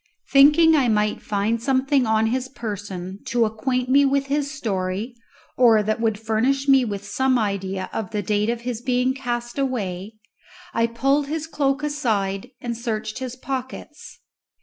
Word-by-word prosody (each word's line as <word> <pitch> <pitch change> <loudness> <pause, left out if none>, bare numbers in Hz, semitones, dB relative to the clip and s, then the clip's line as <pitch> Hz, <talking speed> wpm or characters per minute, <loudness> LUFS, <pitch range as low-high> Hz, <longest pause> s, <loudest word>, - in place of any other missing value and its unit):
Thinking 300 +4 +6
I 270 -5 +3
might 210 -1 +1
find 210 +3 -1
something 265 0 +2
on 220 0 +2
his 255 +3 -1
person 200 -6 -6
to 235 -1 +2
acquaint 250 +4 -1
me 275 +2 +5
with 275 0 +2
his 290 -1 0
story 210 -4 -3 0.4
or 230 -4 +5
that 215 +2 -1
would 220 -2 0
furnish 235 +6 0
me 270 -2 +6
with 205 -3 -4
some 260 +5 +1
idea 195 -3 -2
of 220 -4 -3
the 210 -2 -3
date 210 +2 0
of 235 0 -2
his 240 -1 -4
being 250 0 +1
cast 240 -1 -4
away, 210 -7 -2 0.6
I 230 0 +2
pulled 275 +5 +1
his 315 +1 -3
cloak 285 -2 -1
aside 225 -8 -1
and 240 -1 -3
searched 220 -1 -4
his 255 -2 -5
pockets. 270 +7 -7
240 Hz, 160 wpm, -23 LUFS, 215-270 Hz, 0.6 s, Thinking